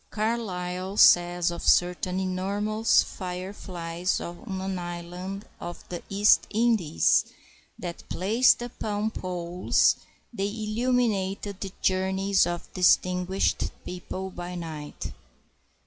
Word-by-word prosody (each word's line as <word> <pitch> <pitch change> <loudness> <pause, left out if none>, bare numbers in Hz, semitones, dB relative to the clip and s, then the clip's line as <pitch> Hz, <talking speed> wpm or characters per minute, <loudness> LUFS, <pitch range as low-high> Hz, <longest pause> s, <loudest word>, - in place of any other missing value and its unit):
Carlyle 195 -4 -2
says 175 -1 +6
of 170 - -6
certain 180 +1 +2
enormous 200 +4 +1
fire 185 +1 -6
flies 175 -1 -3
on 190 +3 -6
an 190 -1 -3
island 180 +3 -6
of 175 0 -8
the 175 -1 -5
East 200 +1 +4
Indies 215 - +3 0.5
that, 175 -2 -7
placed 225 +7 +3
upon 215 -3 -3
poles, 180 -2 +1 0.4
they 200 -3 -1
illuminate 215 -2 0
the 200 -1 -5
journeys 190 +1 +2
of 175 0 -5
distinguished 180 +1 +2 0.2
people 185 +1 -6
by 180 0 -6
night. 155 -4 -6
185 Hz, 100 wpm, -27 LUFS, 175-205 Hz, 0.5 s, says